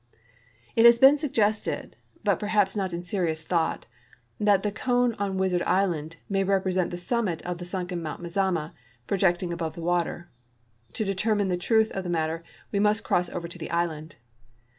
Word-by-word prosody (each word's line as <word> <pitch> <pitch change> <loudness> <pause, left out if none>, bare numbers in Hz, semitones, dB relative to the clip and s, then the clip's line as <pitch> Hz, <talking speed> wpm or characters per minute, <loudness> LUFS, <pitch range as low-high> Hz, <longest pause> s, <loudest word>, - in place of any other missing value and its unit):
It 225 - +5
has 235 0 +9
been 270 +4 +7
sucirested. 220 -8 0 0.3
l)ut - - +2
perhaps 205 -2 +1
not 190 -3 -1
in 170 0 -4
serious 170 -4 -1
tliought, 165 -2 0 0.6
that 205 -2 +3
the 210 - 0
cone 245 +2 +1
on 195 -2 -1
Wizard 185 -2 +1
ishind 165 -5 0
may 195 -1 +1
represent 185 -2 +1
the 175 - -5
summit 180 -3 -1
of 175 -1 -4
the 175 - -6
sunken 180 -1 -3
Mount 155 -3 -5
Mazama, 175 -2 -1 0.3
projecting 175 -1 +1
above 165 -2 -4
the 170 - -7
water. 175 0 -1 0.7
To 215 - -1
deter 200 +3 0
mine 205 -2 0
the 180 - +1
truth 220 +5 +2
of 190 - -4
the 180 - -5
matter 165 -1 -1 0.3
we 200 - 0
must 210 +2 +2
cross 180 0 +1
over 170 -1 -5
to 170 - -9
the - - -6
island. 165 -2 -2
185 Hz, 180 wpm, -26 LUFS, 170-205 Hz, 0.7 s, has